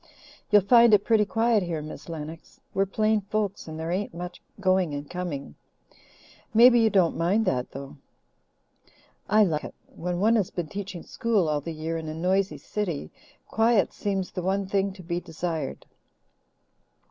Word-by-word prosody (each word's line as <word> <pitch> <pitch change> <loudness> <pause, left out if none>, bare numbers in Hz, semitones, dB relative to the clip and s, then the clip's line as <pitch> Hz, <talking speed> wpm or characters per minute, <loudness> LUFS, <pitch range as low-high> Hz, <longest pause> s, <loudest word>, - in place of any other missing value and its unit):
"You'll 205 -2 +6
find 235 +1 +7
it 200 - +1
pretty 220 -2 +4
quiet 225 +1 +2
here, 170 -3 -3
Miss 150 +1 -9
Lennox. 160 0 -8
We're 195 0 +1
plain 215 +2 +1
folks 200 -1 -3
and 160 0 -7
there 165 +1 -3
ain't 185 -1 -2
much 180 +1 -7 0.2
going 185 -5 +2
and 145 0 -6
coming. 165 - -5 1.0
Maybe 240 +1 +8
you 225 -1 +4
don't 190 -5 +3
mind 195 +7 +1
that, 125 -7 0
though?" 135 +1 -9 1.3
"I 215 +1 +6
like 155 -6 0
it. - - -8
When 175 0 -4
one 225 +4 +4
has 200 -5 0
been 170 -4 -4
teaching 195 -2 -6
school 225 -8 0
all 150 -1 0
the 165 - -5
year 160 +1 -3
in 160 - -7
a 155 - -5
noisy 190 +4 0
city, 175 - -4 0.4
quiet 225 -4 +2
seems 195 -2 -2
the 180 - -4
one 195 +2 0
thing 195 0 0
to 190 -1 -12
be 170 +1 -2
desired. 165 -3 -4
185 Hz, 170 wpm, -26 LUFS, 165-210 Hz, 1.3 s, Maybe